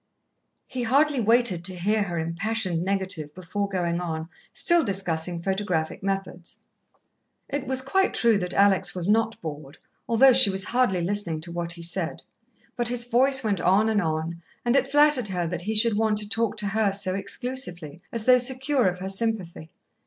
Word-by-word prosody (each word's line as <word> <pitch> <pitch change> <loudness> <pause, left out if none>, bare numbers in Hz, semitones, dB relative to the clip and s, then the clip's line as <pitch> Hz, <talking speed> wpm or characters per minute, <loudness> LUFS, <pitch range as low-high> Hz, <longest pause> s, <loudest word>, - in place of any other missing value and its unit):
He 255 - -6
hardly 280 +4 +2
waited 225 -6 +2
to 185 0 +2
hear 210 +5 0
her 175 -4 -3
impassioned 175 +2 -1
negative 190 -6 -2
before 190 +3 -4
going 175 -3 -1
on, 160 -1 -5 0.2
still 345 -2 +3
discussing 175 -5 -1
photographic 190 -5 -2
methods. 195 -3 -5 0.9
It 280 -1 -4
was 260 0 -1
quite 385 +8 +1
true 230 -4 +3
that 180 -1 -4
Alex 200 -2 +3
was 180 -1 -2
not 225 +2 +1
bored, 145 -2 -8 0.3
although 255 +3 +6
she 255 -4 +6
was 190 0 0
hardly 240 -7 +1
listening 175 -3 -1
to 170 +2 -7
what 170 0 -4
he 170 -1 -9
said. 170 0 -3 0.5
But 240 -2 0
his 240 0 -1
voice 265 +2 +3
went 200 -6 -1
on 200 +6 +3
and 215 -2 +1
on, 160 +1 -3 0.2
and 240 +2 +2
it 275 - +3
flattered 290 -4 +4
her 180 -3 -2
that 175 +1 -4
he 215 +5 -3
should 220 0 +4
want 215 0 +1
to 210 0 -2
talk 225 0 -1
to 210 -1 -2
her 215 0 +1
so 195 -1 -1
exclusively, 185 - -3
as 230 -2 -5
though 255 0 +6
secure 260 0 +1
of 180 0 -1
her 190 +1 -6
sympathy. 195 -6 -3
200 Hz, 180 wpm, -25 LUFS, 175-235 Hz, 0.9 s, although